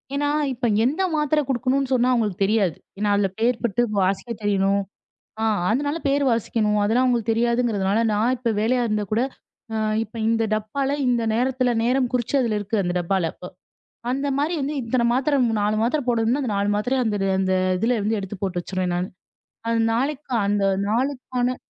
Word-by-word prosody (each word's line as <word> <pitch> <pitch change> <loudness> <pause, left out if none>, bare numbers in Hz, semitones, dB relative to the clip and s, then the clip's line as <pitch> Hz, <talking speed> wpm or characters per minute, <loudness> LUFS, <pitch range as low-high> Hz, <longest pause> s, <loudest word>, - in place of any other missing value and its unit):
ஏன்னா, 290 +1 0 0.2
இப்ப 245 0 -3 0.2
எந்த 300 +9 0
மாத்திர 300 0 +2
குடுக்கணும்னு 265 +1 0
சொன்னா 250 0 +3
அவுங்களுக்குத் 210 -5 +1
தெரியாது. 200 -6 +1 0.2
ஏன்னா 205 +1 0
அதுல 200 -1 +2
பேர் 235 +1 +1
போட்டு 235 0 +1 0.2
வாசிக்கத் 195 +4 -1
தெரியணும். 200 -1 +2 0.6
அ - - 0 0.3
அதனால 285 +7 0
பேர் 280 +1 +2
வாசிக்கணும். 215 -2 0
அதெல்லாம் 230 +5 +2
அவுங்களுக்குத் 235 -3 +1
தெரியாதுங்கறதுனால 230 -3 +1
நான் 230 +5 +2
இப்ப 235 -1 -1
வேலையா 245 +3 +2
இருந்தா 210 -1 -1
கூட, 220 +2 +2 0.5
அ - - -2 0.3
இப்ப 225 - -15
இந்த 225 0 +2
டப்பால 265 +7 -1
இந்த 240 -2 +2
நேரத்துல 255 +1 +1
நேரம் 250 +1 +1
குறிச்சதுல 245 -2 +1
இருக்கு 210 +2 -2
அந்த 175 0 -2
டப்பால 175 -1 0
இப்ப. 180 - -10 0.6
அந்த 275 +2 -1
மாரி 300 +5 0
வந்து 285 +2 -2
இத்தன 235 +1 0
மாத்திர 275 +3 +1 0.3
4 210 +1 +1
மாத்திர 250 +7 +1
போடணும்னா, 235 +3 +1
அந்த 245 - -2
4 200 +1 +1
மாத்திரய 250 +5 0
அந்த 210 -2 0 0.2
அந்த 190 0 +1 0.3
இதுலருந்து 225 -1 +1
எடுத்துப் 195 0 -7
போட்டு 185 -2 -1
வச்சிருவேன் 185 0 -2
நானு. 180 +1 -1 0.6
அது 230 0 +1
நாளைக்கு 275 +3 -2
அந்த 200 0 +1 0.3
நாளுக்குக்கான 250 +1 -1
230 Hz, 165 wpm, -23 LUFS, 205-255 Hz, 0.6 s, சொன்னா